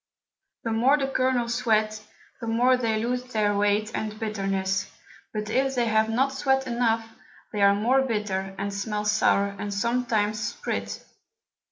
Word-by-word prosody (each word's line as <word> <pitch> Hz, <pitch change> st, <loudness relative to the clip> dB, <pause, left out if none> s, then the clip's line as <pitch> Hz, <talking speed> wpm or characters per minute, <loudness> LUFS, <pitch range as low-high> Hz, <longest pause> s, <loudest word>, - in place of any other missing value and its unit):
The 230 Hz, -, -2 dB
more 250 Hz, +6 st, +4 dB
the 275 Hz, -2 st, -1 dB
Kernels 255 Hz, -3 st, +1 dB
sweat, 215 Hz, -3 st, +1 dB, 0.4 s
the 230 Hz, -, -6 dB
more 245 Hz, +3 st, +4 dB
they 230 Hz, -3 st, 0 dB
lose 245 Hz, +3 st, -1 dB
their 215 Hz, -5 st, 0 dB
Weight 205 Hz, +2 st, +1 dB
and 215 Hz, 0 st, -4 dB
Bitterness: 195 Hz, -3 st, -1 dB, 0.4 s
but 210 Hz, -1 st, -4 dB
if 270 Hz, +3 st, +1 dB
they 240 Hz, -1 st, +2 dB
have 220 Hz, -1 st, +2 dB
not 265 Hz, +4 st, +1 dB
sweat 265 Hz, 0 st, +1 dB
enough, 230 Hz, -2 st, 0 dB, 0.5 s
they 210 Hz, -, -1 dB
are 200 Hz, 0 st, +6 dB
more 245 Hz, +6 st, +3 dB
bitter, 205 Hz, -6 st, -2 dB
and 200 Hz, 0 st, -3 dB
smell 210 Hz, +1 st, -3 dB
sour, 200 Hz, -1 st, +2 dB
and 205 Hz, 0 st, -4 dB
sometimes 215 Hz, -1 st, 0 dB
sprit. 210 Hz, -, -4 dB
220 Hz, 155 wpm, -26 LUFS, 205-245 Hz, 0.5 s, are